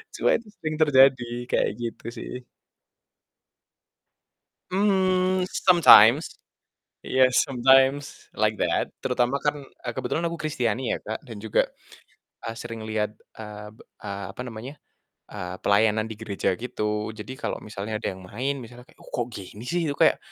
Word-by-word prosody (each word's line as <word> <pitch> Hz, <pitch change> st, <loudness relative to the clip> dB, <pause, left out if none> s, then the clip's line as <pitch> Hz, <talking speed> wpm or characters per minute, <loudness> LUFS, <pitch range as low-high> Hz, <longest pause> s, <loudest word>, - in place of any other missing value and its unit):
Cuma -, -, +1 dB
itu 230 Hz, -1 st, -15 dB
sering 155 Hz, -1 st, -3 dB
terjadi, 135 Hz, -3 st, +6 dB, 0.3 s
kayak -, -, +2 dB
gitu 115 Hz, -1 st, -5 dB
sih. -, -, -7 dB, 2.4 s
Mmm, 185 Hz, -2 st, +2 dB
sometimes 160 Hz, -, +6 dB, 0.7 s
iya, 130 Hz, 0 st, +4 dB, 0.2 s
sometimes 135 Hz, +2 st, +2 dB
like -, -, +1 dB
that, -, -, 0 dB
terutama 125 Hz, +2 st, +1 dB
kan, 145 Hz, 0 st, +1 dB, 0.3 s
eee, 120 Hz, -, -3 dB
kebetulan 130 Hz, +6 st, -2 dB
aku 170 Hz, -, -6 dB
kristiani 125 Hz, -5 st, -1 dB
ya, -, -, -2 dB
Kak, 110 Hz, -, -4 dB
dan 115 Hz, -3 st, -8 dB
juga, 110 Hz, -, +2 dB, 0.8 s
eee, 115 Hz, 0 st, -4 dB
sering 115 Hz, -2 st, -7 dB
lihat, 110 Hz, -1 st, -2 dB, 0.2 s
eee, 105 Hz, -1 st, -8 dB
be -, -, -22 dB, 0.2 s
eee, 100 Hz, -1 st, -5 dB
apa 125 Hz, -, -5 dB
namanya, 120 Hz, +4 st, -8 dB, 0.6 s
eee, 90 Hz, -3 st, -6 dB
pelayanan 110 Hz, +2 st, +3 dB
di 110 Hz, -, -6 dB
gereja, 100 Hz, -3 st, -1 dB
gitu. 105 Hz, -3 st, -3 dB
Jadi 110 Hz, +4 st, -8 dB
kalau -, -, -3 dB
misalnya 105 Hz, +1 st, -5 dB
ada -, -, -3 dB
yang 95 Hz, -, -13 dB
main, 130 Hz, +9 st, -2 dB
misalnya 125 Hz, 0 st, -11 dB
kayak, -, -, -22 dB
ko -, -, -14 dB
kok, 120 Hz, -, -1 dB
gini 100 Hz, +3 st, -10 dB
sih, 175 Hz, -1 st, 0 dB
itu 145 Hz, -, -1 dB
kayak, -, -, +4 dB
120 Hz, 150 wpm, -25 LUFS, 110-140 Hz, 2.4 s, terjadi